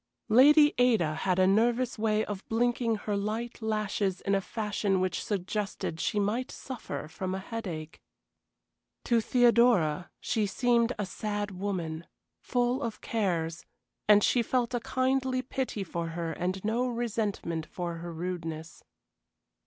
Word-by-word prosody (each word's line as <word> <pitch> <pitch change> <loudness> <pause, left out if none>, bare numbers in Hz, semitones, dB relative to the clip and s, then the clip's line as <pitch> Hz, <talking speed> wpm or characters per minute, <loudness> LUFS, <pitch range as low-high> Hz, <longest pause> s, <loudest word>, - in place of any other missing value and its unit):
Lady 295 +6 +7
Ada 220 -11 +3
had 180 +3 0
a 185 - +5
nervous 235 +5 +2
way 215 0 +1
of 205 -1 -5
blinking 235 0 +1
her 210 0 -3
light 220 +4 -3
lashes 210 -3 -1
in 195 - 0
a 195 - +3
fashion 205 -2 -1
which 185 -2 -1
suggested 200 -4 -3
she 210 - 0
might 220 +5 0
suffer 255 - -6
from 185 +3 -4
headache. 190 -6 -6 1.0
To 235 -2 +3
Theodora 235 -10 +3
she 220 -4 0
seemed 235 +2 +2
a 205 - -1
sad 205 +1 -3
woman, 180 -4 -4 0.3
full 245 +2 0
of 230 -5 -4
cares, 170 -7 -1 0.5
and 205 -1 +7
she 245 - +3
felt 245 +1 0
a 245 - +1
kindly 260 +1 0
pity 255 -6 -3
for 170 -2 -4
her 165 0 -3
and 185 +4 -3
no 235 +4 +1
resentment 215 -9 -2
for 170 -2 -4
her 170 +1 -6
rudeness. 165 -2 -5
210 Hz, 135 wpm, -29 LUFS, 180-235 Hz, 1.0 s, Lady